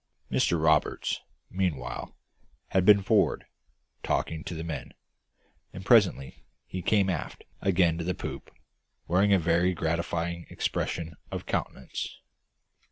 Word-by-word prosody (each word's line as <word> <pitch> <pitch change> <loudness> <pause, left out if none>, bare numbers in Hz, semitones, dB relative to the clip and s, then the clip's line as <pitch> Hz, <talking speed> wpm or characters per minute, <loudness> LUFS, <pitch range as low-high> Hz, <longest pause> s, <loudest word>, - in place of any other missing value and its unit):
Mr 85 - +2
Roberts, 80 -1 +2 0.3
meanwhile, 85 -10 -3 0.5
had 95 -1 +2
been 100 -2 +7
forward, 105 +1 +2 0.6
talking 80 -1 -1
to 85 - -5
the 80 - -4
men; 80 -5 -6 0.8
and 95 0 -8
presently 100 - +3 0.2
he 95 - -5
came 100 +2 +3
aft 90 -5 -3 0.2
again 85 -3 +3
to - - -2
the 90 +1 -1
poop, - - -6 0.6
wearing 95 +4 +3
a 100 - +7
very 90 +2 +2
gratified 85 +1 -2
expression 85 -1 -2
of - - -5
countenance. 65 - -4
85 Hz, 120 wpm, -28 LUFS, 80-95 Hz, 0.8 s, been